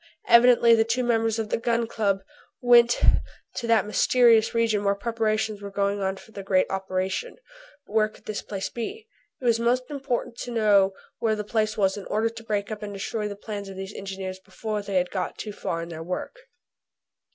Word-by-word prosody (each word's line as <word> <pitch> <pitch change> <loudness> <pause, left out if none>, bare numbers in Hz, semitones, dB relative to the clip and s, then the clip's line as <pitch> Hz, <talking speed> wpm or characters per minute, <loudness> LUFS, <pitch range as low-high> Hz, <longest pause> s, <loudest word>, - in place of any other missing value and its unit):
Evidently 235 0 +7
the 225 -1 +5
two 235 +3 0
members 225 -2 +1
of 220 -1 -3
the - - 0
Gun 235 0 +1
Club 200 -4 -1 0.4
went 240 -1 +5 0.5
to 235 - -4
that 225 -3 +4
mysterious 230 +1 +4
region 225 -3 +2
where 200 0 +2
preparations 215 -1 -1
were 200 - -6
going 200 0 -1
on 190 0 -1
for 220 - -15
the 200 - -7
great 190 -1 +2
operation. 190 - -2 0.5
But - - -15
where 215 -1 +3
could - - -20
this 215 - -4
place 195 -2 -4
be? 415 - -6 0.3
It 255 - -8
was 230 -1 +3
most 250 +3 0
important 265 -4 -3
to - - -5
know 205 -4 +3 0.3
where 220 -2 +1
this 210 -1 -6
place 215 -1 +1
was 195 -1 +2
in 200 - -7
order 220 +2 +1
to 225 0 -11
break 210 -1 -2
up 215 - -5
and 210 -1 -5
destroy 210 +2 -3
the 205 - -6
plans 205 -1 -6
of 195 - -8
these 190 +1 -6
engineers 190 -1 -6
before 210 +3 -5
they 200 -1 -5
had 180 -1 +1
got 185 -2 -3
too 210 - -6
far 165 -4 -3
in 170 - -8
their 160 -1 -7
work. 180 - -4
215 Hz, 205 wpm, -25 LUFS, 195-230 Hz, 0.5 s, Evidently